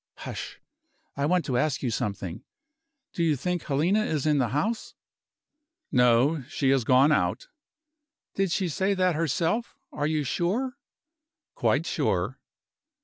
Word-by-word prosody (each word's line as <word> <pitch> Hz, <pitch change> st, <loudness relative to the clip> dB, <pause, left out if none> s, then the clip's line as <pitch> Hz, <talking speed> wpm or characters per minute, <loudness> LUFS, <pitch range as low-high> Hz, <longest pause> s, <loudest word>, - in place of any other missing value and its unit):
Hush! -, -, -7 dB, 0.6 s
I 140 Hz, +1 st, 0 dB
want 180 Hz, +1 st, +2 dB
to 125 Hz, -3 st, 0 dB
ask 150 Hz, 0 st, 0 dB
you 125 Hz, -, 0 dB
something. 100 Hz, -3 st, -3 dB, 0.7 s
Do -, -, -3 dB
you 160 Hz, -3 st, +3 dB
think 175 Hz, +6 st, -2 dB
Helena 170 Hz, +10 st, +1 dB
is 155 Hz, -8 st, -1 dB
in 150 Hz, -2 st, +3 dB
the 125 Hz, -, +2 dB
house?" 200 Hz, -, -2 dB, 1.0 s
"No 125 Hz, +5 st, +4 dB
she 140 Hz, -4 st, +1 dB
has 135 Hz, -3 st, +3 dB
gone 130 Hz, +5 st, +5 dB
out." -, -, 0 dB, 0.8 s
"Did 195 Hz, -1 st, 0 dB
she 190 Hz, +1 st, 0 dB
say 190 Hz, +5 st, 0 dB
that 185 Hz, -1 st, +2 dB
herself? 165 Hz, -, -1 dB, 0.2 s
Are 145 Hz, -, -1 dB
you 155 Hz, -1 st, 0 dB
sure?" 200 Hz, -, -1 dB, 0.8 s
"Quite -, -, +1 dB
sure." -, -, -1 dB
155 Hz, 140 wpm, -27 LUFS, 135-180 Hz, 1.0 s, gone